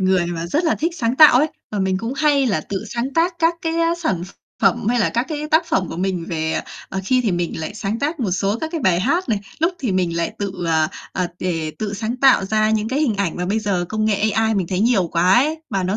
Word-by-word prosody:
người 185 -2 +2
mà 170 -1 -4
rất 305 - 0
là 320 - +2
thích 330 +3 -1
sáng 240 -3 -1
tạo 300 -5 +8
ấy, 300 - +3 0.2
và 210 - -3
mình 190 -1 +1
cũng 230 +4 -4
hay 285 -2 +3
là 195 -10 +1
tự 195 +5 -5
sáng 255 +3 -2
tác 340 +2 +2
các 330 0 +3
cái, 325 0 -1
á, 335 0 +2
sản 315 - -2
ph 190 - -14 0.3
phẩm - - +2
hay 245 +1 +2
là - - +2
các 235 +3 -1
cái 300 -1 -4
tác 325 +2 +3
phẩm 185 - 0
của - - -6
mình 180 -1 -2
về, 160 -2 -2
ờ, - - 0 0.3
ờ 190 - -3
khi 255 +6 +2
thì 220 -7 0
mình 175 -2 -2
lại 160 +6 -5
sáng 215 +1 -3
tác 295 +3 -2
một 215 -6 0
số 195 +4 0
các 320 - -2
cái 330 - -2
bài 185 -7 +2
hát 335 - 0
này, 215 - +1 0.2
lúc 330 +4 +2
thì 240 -8 -2
mình 180 -3 0
lại 170 +5 -1
tự, 200 -2 -3
ờ, 160 -1 +2 0.2
ờ, 180 -1 -1
đề 165 -4 -2
tự 210 -1 -3
sáng 225 +4 -3
tạo 255 -6 +5
ra 215 +2 +1
những 220 0 0
cái 270 +3 -1
hình 265 -8 +1
ảnh 195 -4 -1
mà 180 - -2
bây 210 +4 0
giờ 200 -5 -1
công 215 0 -1
nghệ 215 0 +1
AI 220 +1 +1
mình 190 -3 0
thấy 185 +2 -2
nhiều 215 -5 +3
quá 175 +2 +2
ấy, 305 +7 +2
mà 195 - 0
nó 185 +3 -1
215 Hz, 280 wpm, -20 LUFS, 185-270 Hz, 0.3 s, tạo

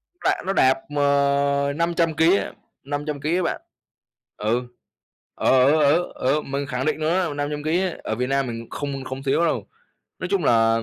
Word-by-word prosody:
nó 355 - -3
lại - - -2
nó 195 - +1
đạp, 130 -6 +4 0.2
ờ, 140 0 +2
500 170 -1 +1
ký 165 +5 +4
á, - - -3 0.3
500 145 0 -4
ký 155 +4 0
á 185 - +1
bạn. 170 - -2 0.8
Ừ, 115 +4 0 0.7
ờ, - - -1 0.2
ở 155 0 +3
ở 175 - +1
ở 135 +4 +1
mình 140 +1 -3
khẳng 130 -1 -3
định 155 - 0
luôn 155 +1 +1
á, 180 -5 0
500 145 +1 -3
ký 165 +4 +1
á, 185 -3 -1
ở - - -2
Việt 125 +3 -1
Nam 135 0 +1
mình 115 -1 -6
không 140 -2 -4
không 130 +1 -6
thiếu 140 +5 +2
đâu. 165 - -1 0.5
Nói 185 - -4
chung 190 -6 +1
là 115 -1 +3
145 Hz, 200 wpm, -23 LUFS, 135-160 Hz, 0.8 s, đạp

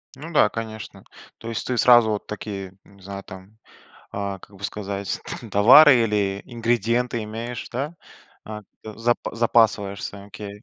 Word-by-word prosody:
Ну 155 +6 -9
да, - - +5
конечно. 110 -1 -7 0.3
То 115 - -8
есть 115 - -4
ты 125 -2 -1
сразу 120 -3 +6
вот 105 - -3
такие, 100 -3 -7
не 100 -1 -21
знаю, 100 +1 -8
там, 95 +3 -13 0.5
а, 100 -1 -4
как 100 +1 -17
бы 100 - -11
сказать, 100 -1 -4 0.2
там, - - -10
товары 130 +7 +8
или 100 -2 -1
ингредиенты 120 0 -1
имеешь, 115 +3 -6
да? 140 +7 -4 0.5
А, 105 -1 -8 0.2
за 115 +2 0 0.2
запасаешься? 105 -4 +1
Окей. 105 +1 -10
110 Hz, 145 wpm, -23 LUFS, 100-120 Hz, 0.5 s, товары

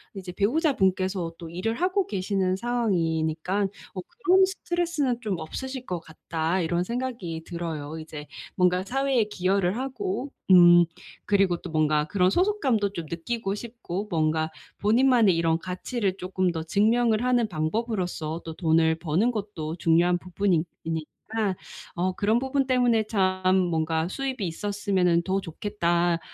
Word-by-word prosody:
이제 190 -2 -6
'배우자분께서 190 - +1
또 165 -1 -8
일을 185 +7 -2
하고 370 - +1
계시는 190 -1 0
상황이니까 185 -5 0 0.3
뭐 185 - -5 0.2
그런 375 +1 +6
스트레스는 340 -9 -1
좀 200 -6 -2
없으실 260 +10 -6
것 180 -2 -2
같다.' 160 +2 -2
이런 170 +1 0
생각이 230 -8 -4
들어요. 160 -3 -5
이제 150 -1 -8 0.3
뭔가 180 0 +2
사회에 265 +1 +1
기여를 190 -1 0
하고 255 -1 -3 0.2
음 175 -1 +8 0.4
그리고 195 -4 +2
또 175 - -9
뭔가 155 -1 +2
그런 185 -1 +2
소속감도 265 - +1
좀 170 -4 -5
느끼고 195 +4 -3
싶고 215 -4 -5
뭔가 160 -1 +1 0.3
본인만의 230 -3 +4
이런 165 -1 +2
가치를 190 +2 -3
쪼끔 185 -1 -1
더 160 -1 -4
증명을 220 +6 +2
하는 245 -3 +2
방법으로써 175 -2 -2
또 165 - -5
돈을 160 -1 +2
버는 180 +9 +1
것도 195 -8 -4
중요한 175 +1 +3
부분이니 180 -2 0 0.2
이니까 190 +6 -3 0.4
어 185 +2 0
그런 215 +5 +2
부분 265 +1 0
때문에 245 -4 +3
참 185 -3 +2
뭔가 160 -2 0
수입이 255 -1 -3
있었으면은 185 -1 +1
더 190 +2 0
좋겠다. 175 -2 0
185 Hz, 315 characters per minute, -26 LUFS, 170-230 Hz, 0.4 s, 음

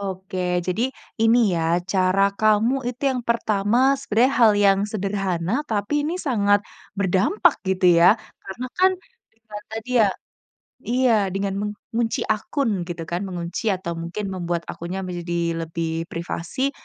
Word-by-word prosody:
Oke. 190 -1 -5 0.3
Jadi, 185 +5 -1 0.4
ini 225 +2 +5 0.2
ya, 165 - 0 0.3
cara 185 0 +3 0.2
kamu 215 +3 +3
itu 250 +2 -7
yang 255 -1 -2
pertama 220 -1 +1 0.2
sebenarnya 255 0 +2
hal 225 -2 +7
yang 195 0 +4
sederhana, 195 -3 -2 0.2
tapi 205 +4 -1
ini 330 - -2
sangat 205 -6 +3 0.4
berdampak, 200 - +3
gitu 190 -1 +2
ya. 180 +6 +7 0.3
Karena 240 +7 -6
kan, 375 +1 +6 0.4
privat 220 -2 -11
tadi 225 +2 -6
ya 210 - +5 0.8
iya. 250 0 +2 0.2
Dengan 195 0 -1 0.4
mengunci 230 0 0
akun, 225 +4 0 0.2
gitu 170 -1 -5
kan? 175 +1 -1
Mengunci 175 +2 -5
atau 180 -2 -5
mungkin 170 +5 -5
membuat 175 -2 -2
akunnya 175 +3 -5
menjadi 170 -2 -3
lebih 165 0 -3
privasi. 170 +10 -3
200 Hz, 135 wpm, -23 LUFS, 175-225 Hz, 0.8 s, hal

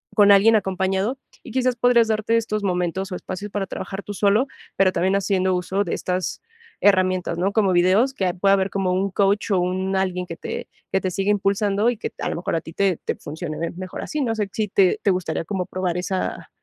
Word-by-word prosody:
con 205 -2 +6
alguien 215 +3 +6
acompañado. 190 +4 -1 0.3
Y - - -10
quizás 255 -1 +1
podrías 235 -1 +4
darte 220 +1 +1
estos 215 -2 -2
momentos 180 +1 -1
o - - -2
espacios 185 +3 -6
para 200 -1 -2
trabajar 195 +1 -6
tú 205 - -6
solo, 205 +6 +2 0.3
pero, 190 -1 +4
también 185 +2 +1
haciendo 190 -1 +1
uso 190 +3 -1
de 175 - -3
estas 180 -1 -3 0.4
herramientas, 185 -3 +2
¿no? 190 +3 0
Como 205 -3 +3
videos, 190 +9 +3
que 195 - -2
ahí 180 - 0
pueda 195 +2 +2
haber 195 0 +2
como 195 -2 0
un 190 +2 0
coach, 200 +3 +1
o 190 - +3
un 185 +2 -1
alguien 185 -1 -1
que 165 - -6
te - - -5 0.2
que 195 - +2
te 185 - -2
siga 195 +3 0
impulsando 200 +2 +1
y 245 - -1
que - - -4
a - - -2
lo - - -3
mejor 170 - -2
a - - -2
ti 160 - -11
te 195 -2 +1
te - - -1
funcione 155 +1 -6 0.2
mejor 185 0 -6
así. 305 - -4
No 230 -4 0
sé, 210 -2 -2
si 215 0 -1
te 195 +1 +3
te 200 - +4
gustaría 170 -3 -2
como 190 0 -2
probar 180 -1 -2
esa 185 +1 -3
195 Hz, 225 wpm, -22 LUFS, 185-205 Hz, 0.4 s, con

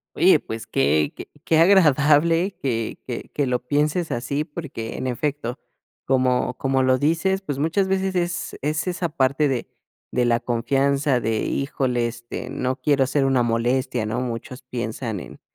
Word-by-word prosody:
Oye - - +5
pues 110 0 -7
que 75 +1 +1
que - - -9 0.2
qué 160 - +3
agradable 165 0 +4
que 115 -4 -2
que 120 -2 -6
que 145 - 0
lo 125 -1 0
pienses 150 +4 +1
así 135 +5 -1
porque 145 -8 -6
en - - -4
efecto 130 0 -2 0.5
como 125 -1 +1
como 135 0 +1
lo 130 0 +3
dices 165 +7 +1
pues 145 -7 -4
muchas 170 +6 +1
veces 190 0 0
es 175 +2 -2
es 155 +4 -1
esa 180 -1 -1
parte 140 0 +2
de 130 -4 -2 0.4
de 125 - +1
la 120 -1 +3
confianza 135 +3 +1
de 110 -1 -1
híjole 130 -3 0
este 120 +1 -7
no 130 0 -2
quiero 140 -1 +3
ser 140 +1 +1
una 130 -2 +3
molestia, 120 0 0
¿no? 110 +3 -2
Muchos 125 +1 -5
piensan 120 -3 -4
en - - -11
135 Hz, 160 wpm, -23 LUFS, 120-150 Hz, 0.5 s, Oye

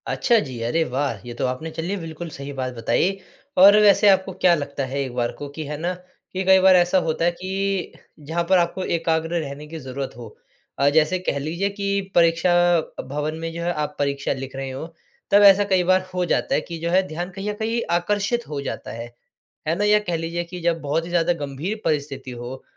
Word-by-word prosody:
अच्छा, 240 -2 +2
जी। 130 - -5
अरे 140 +8 +1
वाह! 135 -5 -2
ये 120 - -6
तो - - +1
आपने 130 +6 -3
चलिए 170 +5 -3
बिल्कुल 165 -1 -7
सही 140 -1 -7
बात 130 -2 -3
बताई। 175 +11 0 0.4
और 195 +3 +9
वैसे 205 0 +6
आपको 190 0 +3
क्या 180 0 +4
लगता 145 -2 -3
है 135 +2 -4
एक 130 -3 -4
बार 120 -1 0
को 145 - -5
कि, 155 +2 -6
है 150 +1 -5
ना? 175 +4 -2
कि 185 +1 -8
कई 190 0 +7
बार 190 0 +6
ऐसा 180 +1 +4
होता 160 +1 0
है 175 - +3
कि, 190 +2 -3 0.3
जहाँ 160 +4 -2
पर 190 - +6
आपको 175 +2 0
एकाग्र 165 0 0
रहने 145 0 -6
की 160 +1 -7
ज़रूरत 135 0 -5
हो। 120 -2 -8 0.5
अ, 140 +1 +5
जैसे 160 +5 +2
कह 180 - -2
लीजिए 170 +7 -2
कि 200 0 -1
परीक्षा 170 +1 +4 0.5
भवन 150 +3 -3
में 165 0 -4
जो 170 - -5
है 175 - 0
आप 150 -1 -3
परीक्षा 140 -1 0
लिख 135 0 -7
रहे 135 0 -4
हों, 135 +5 -6 0.4
तब 205 +1 +6
ऐसा 200 0 +8
कई 185 -1 +4
बार 185 0 +4
हो 180 -1 0
जाता - - +1
है - - +1
कि 170 - -7
जो 170 +1 -2
है 185 +2 +4
ध्यान 175 +2 -4
कहीं 195 +2 -5
न - - -5
कहीं 225 +2 -1
आकर्षित 205 +7 0
हो 145 -2 -4
जाता - - -5
है। 115 +1 -6 0.6
है 165 - +2
ना? 200 - -1
या 210 0 +5
कह 180 -5 -3
लीजिए 165 +1 -3
कि 180 +1 -8
जब 165 -1 0
बहुत 150 +3 -1
ही - - -8
ज़्यादा 175 0 +2
गंभीर 155 +10 -4
परिस्थिति 140 -3 -2
हो, 125 +2 -8
165 Hz, 225 wpm, -23 LUFS, 140-185 Hz, 0.6 s, और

